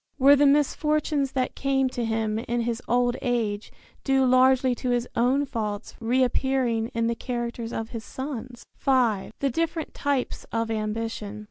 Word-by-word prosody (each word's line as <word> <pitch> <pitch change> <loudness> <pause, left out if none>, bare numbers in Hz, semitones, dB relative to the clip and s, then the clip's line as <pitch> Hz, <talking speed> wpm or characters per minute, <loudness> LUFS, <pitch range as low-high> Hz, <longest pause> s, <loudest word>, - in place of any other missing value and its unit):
Were 280 +1 +7
the 285 0 +4
misfortunes 295 0 +1
that 255 -1 -1
came 270 -1 +1
to 245 -1 -3
him 220 -1 -1
in 235 +1 -2
his 235 0 -2
old 245 0 +2
age 225 -4 -1 0.3
due 270 -1 +3
largely 255 0 +4
to 250 +1 -3
his 245 0 +1
own 260 +4 +2
faults 210 -4 -4
reappearing 250 -1 +1
in 230 0 +1
the 235 - +1
characters 235 -1 -4
of 225 -1 -4
his 230 -2 -6
sons? 255 -3 -7
V. 240 -7 +2
THE 275 -1 +1
DIFFERENT 330 +3 -2
TYPES 285 -3 -2
OF 230 0 -1
AMBITION. 215 -1 -3
245 Hz, 155 wpm, -25 LUFS, 230-270 Hz, 0.3 s, Were